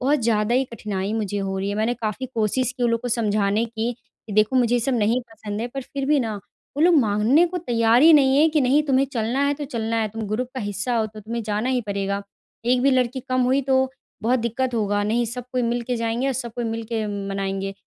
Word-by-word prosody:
बहुत 280 +3 +2
ज़्यादा 220 0 +1
ही 260 +2 +3
कठिनाई 205 -2 -3
मुझे 205 -2 -2
हो 195 -1 -2
रही 195 +1 -2
है। 205 - -2
मैंने 220 +3 +1
काफ़ी 225 +2 -4
कोशिश 235 +3 0
की 250 - -3
उन 240 - +3
लोग 230 - 0
को 245 - -3
समझाने 215 -2 +1
की 230 +1 -3 0.3
कि 215 - -7
देखो 215 +5 +3
मुझे 245 -1 +3
ये 240 - +2
सब 265 +2 0
नहीं 225 +4 +2
पसंद 210 -1 -6
है 235 - -2
पर 270 - -2
फ़िर 275 +1 -5
भी 295 -1 +3
ना 225 -3 -2 0.4
वो 295 - +1
लोग 345 -1 +6
मानने 220 +8 +3
को 360 +1 -4
तैयार 235 -3 +3
ही 325 +1 +8
नहीं 270 -2 +5
हैं 315 +2 +5
कि 305 -1 +2
नहीं 275 +3 +3
तुम्हें 270 0 +3
चलना 235 +3 -1
है 285 - +1
तो 290 +1 -5
चलना 230 -4 -2
है। 220 -1 0
तुम 225 +2 -6
ग्रुप 240 +4 -2
का 260 - -3
हिस्सा 210 +3 -2
हो 220 -1 +1
तो 215 0 -11
तुम्हें 230 +3 -4
जाना 215 +3 -2
ही 255 -1 +1
पड़ेगा। 200 0 -2 0.4
1 250 +1 +2
भी 275 - +4
लड़की 255 0 +1
कम 255 0 +1
हुई 260 +2 +2
तो 265 0 +2 0.3
बहुत 245 +4 +2
दिक़्क़त 240 +2 -1
होगा 205 -2 0
नहीं 230 +3 +1
सब 240 +2 -5
कोई 250 -1 0
मिल 235 +1 0
के 245 - +1
जाएँगे 230 +3 -1
और 270 - +1
सब 240 -3 -4
कोई 240 - -2
मिल 225 0 -3
के 220 -1 -2 0.2
मनाएँगे। 195 0 -3
235 Hz, 255 wpm, -23 LUFS, 215-255 Hz, 0.4 s, ही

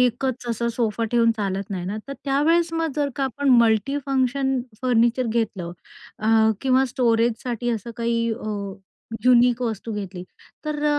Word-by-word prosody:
एकच 250 0 0
असं 235 +1 -1
सोफा 230 -1 -1
ठेवून 230 -1 +4
चालत 195 -1 -3
नाही 180 -2 -3
ना? 205 +3 -3
तर - - -4
त्यावेळेस, 325 +5 +2
मग 330 -3 -1
जर 290 -1 +1
आपण 270 +2 -1
मल्टीफंक्शन 265 +3 +1 0.2
फर्निचर 240 0 +2
घेतलं 215 -6 -2 0.5
अ, 220 0 +4
किंवा 265 0 +3
स्टोरेजसाठी 240 0 0
असं 230 +1 -3
काही 230 0 0
अ, 220 - -7 0.8
युनिक 245 0 +5
वस्तू 225 -1 -3
घेतली, 190 -3 -6 0.4
तर 300 -1 -2
235 Hz, 135 wpm, -23 LUFS, 225-265 Hz, 0.8 s, युनिक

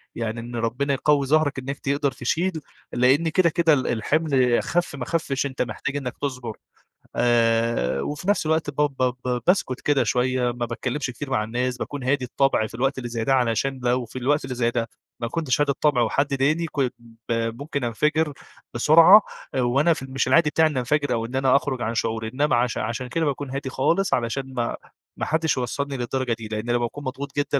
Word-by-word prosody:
يعني 115 0 -3
إن 120 +1 -7
ربنا 120 +5 -1
يقوي 140 0 +2
ظهرك 145 -1 +2
إنك 135 +2 -5
تقدر 140 0 0
تشيل، 160 +9 -1 0.4
لإن 130 +7 +3
كده 170 +1 +3
كده 165 -1 +3
ال 130 -3 +1
الحِمل 130 0 +2
خف 175 -2 -1
ما 130 -3 -5
خفش 145 -4 -1
أنت 135 -2 -4
محتاج 140 +3 -3
إنك 130 -3 -4
تصبر. 125 -5 -4 0.6
آآ، 115 - +2
وفي 150 - -4
نفس 205 -5 +2
الوقت 160 -1 +1
ب 145 - -8
ب 130 -4 +1
ب 125 -1 0
باسكت 175 -9 +1
كده 145 -2 +2
شوية، 125 0 +1
ما 120 0 -3
باتكلمش 125 +4 -3
كتير 130 +3 -7
مع 130 -5 +1
الناس، 125 +3 -2
باكون 145 +1 -5
هادي 130 0 +1
الطبع 125 -3 +1
في - - -16
الوقت 135 +3 0
اللي 120 -2 -5
زي 115 -1 -3
ده 135 - +2
علشان 130 +1 +1
لو 125 0 +1
في 120 +3 -8
الوقت 145 +4 +1
اللي 130 -1 -5
زي 120 -1 +1
ده 115 -2 -2 0.3
ما 115 - -2
كنتش 145 +1 0
هادي 145 -1 +3
الطبع، 140 -2 +2
وحد 140 +5 +1
ضايقني 150 +5 +1
كن 135 -3 0 0.4
ب - - +2 0.3
ممكن 140 -2 -3
انفجر 150 +6 0 0.4
بسرعة، 165 - +7 0.3
آآ، 130 - +1
وأنا 135 +7 +3
في 155 - -7
مش 130 -1 -1
العادي 165 -2 +4
بتاعي 160 +1 +3
إني 140 -4 -2
انفجر 145 +2 0
أو 115 -1 -1
إن 120 +3 -7
أنا 135 0 +3
أخرج 135 -3 0
عن 115 0 -2
شعوري، 110 -1 -1
إنما 145 0 +2
عش 120 0 0
عشان 120 +3 -3
كده 160 +6 -1
باكون 145 -1 -2
هادي 135 0 -4
خالص، 165 +9 +1
علشان 130 +3 -2
ما 120 -2 -2 0.4
ما - - -2
حدش 160 -1 0
يوصلني 140 +2 -2
للدرجة 125 0 -1
دي، 115 -1 -7
لإن 110 +2 -4
لمّا 120 - +3
بأكون 120 +4 -4
مضغوط 140 +1 -6
جدًا، 145 0 +1
130 Hz, 205 wpm, -24 LUFS, 120-145 Hz, 0.6 s, بسرعة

